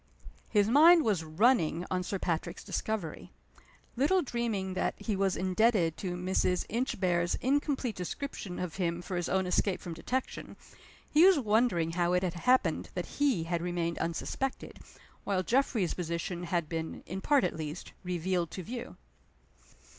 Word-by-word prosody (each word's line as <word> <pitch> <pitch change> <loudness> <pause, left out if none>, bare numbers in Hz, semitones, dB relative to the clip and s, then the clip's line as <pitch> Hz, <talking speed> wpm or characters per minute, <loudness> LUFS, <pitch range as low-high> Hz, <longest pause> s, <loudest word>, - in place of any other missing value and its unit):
His 205 -2 +3
mind 320 +7 +7
was 200 -7 +1
running 170 0 +2
on 185 -1 +1
Sir 195 +2 -3
Patrick's 170 -3 -3
discovery. 205 -8 -4 0.7
Little 305 +9 +3
dreaming 225 -7 -2
that - - -1
he 215 - -2
was 195 -1 +1
indebted 185 -2 +2
to 180 -2 -3
Mrs. 180 0 0
Inchb 235 -3 -2
are's 175 -1 +2
incomplete 270 -3 0
description 185 0 -5
of 180 -2 -4
him 175 -2 -1
for 185 - -5
his 175 -1 -2
own 190 0 +1
escape 185 +1 +1
from 170 - -6
detection, 250 +11 -4 0.5
he 305 +3 +5
was 380 -2 +7
wondering 215 - +2
how 175 +1 +1
it 180 +1 +2
had 180 -2 -1
happened 250 +9 +2
that - - -5
he 260 - +3
had 170 0 -2
remained 170 -1 -2
unsuspected, 170 +10 -3 0.4
while 190 -2 0
Geoffrey's 235 -6 +1
position 170 +1 -3
had 170 -2 -1
been 160 0 -5
(in 190 +2 -5
part 285 +2 +3
at - - 0
least) 155 +1 -6
revealed 180 -1 -1
to 185 - -6
view. 240 0 -6
185 Hz, 155 wpm, -30 LUFS, 175-235 Hz, 0.7 s, mind